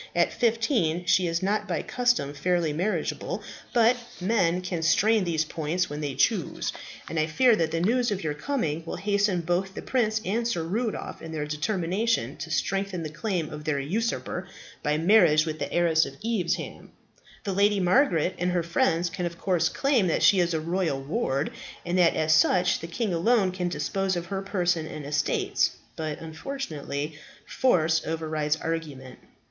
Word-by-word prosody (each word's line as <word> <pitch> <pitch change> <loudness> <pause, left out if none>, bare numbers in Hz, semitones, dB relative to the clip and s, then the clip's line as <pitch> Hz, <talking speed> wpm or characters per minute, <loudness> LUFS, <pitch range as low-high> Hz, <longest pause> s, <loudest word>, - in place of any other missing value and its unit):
"At 170 0 +2
fifteen 225 - +1
she 180 +1 +3
is 165 +1 -1
not 210 +2 0
by 170 -4 -2
custom 245 - 0
fairly 165 +1 0
marriageable; 185 +8 -2 0.3
but 235 +1 +4 0.2
men 185 -3 +1
can 180 -2 -3
strain 205 +6 +3
these 160 -2 0
points 160 +2 -2
when 150 +1 -4
they 145 -3 -3
choose; - - 0 0.3
and 165 - -2
I 155 - +2
fear 235 +9 +4
that 165 -1 +1
the 165 +1 -1
news 240 +6 +2
of 200 -3 -2
your 155 -2 -1
coming 160 - -2
will 165 - -5
hasten 200 -1 +1
both 175 +3 -1
the - - -6
prince 220 -4 +1
and 230 +4 0
Sir 175 -8 -1
Rudolph 215 +7 -3
in 165 - -7
their 155 -2 -3
determination 175 - -1
to 150 +1 -6
strengthen 190 +3 -1
the 155 - -5
claim 175 -2 -2
of 150 0 -7
this 145 -3 -1
usurper 225 - -2 0.3
by 150 -1 +1
marriage 165 -3 +5
with 155 -1 -4
the 140 - -3
heiress 165 -3 +3
of 135 - -10
Evesham. 220 -7 -2 0.5
The 200 -4 -2
Lady 200 +1 +3
Margaret 180 - +3
and 180 +1 0
her 175 -2 +1
friends 170 -1 +1
can 175 +1 -3
of 170 0 -8
course 175 -3 +1
claim 270 -8 +2
that 165 - +1
she 195 - +6
is 170 -1 +1
a - - +1
royal 165 -3 -1
ward, 140 - -1 0.3
and 175 +1 -1
that 170 -2 +4
as 155 0 +2
such 175 +2 +3
the 165 - -6
king 195 +3 -2
alone 195 +3 +3
can 180 -1 -2
dispose 185 +5 -1
of 175 -1 -3
her 195 +1 -3
person 180 -5 0
and 150 -2 -7
estates. 145 0 0 0.2
But, 155 -2 -4
unfortunately, 160 - -5 0.3
force 160 -10 +2
overrides 155 -2 -1
argument." 155 -5 -5
175 Hz, 175 wpm, -26 LUFS, 155-200 Hz, 0.5 s, she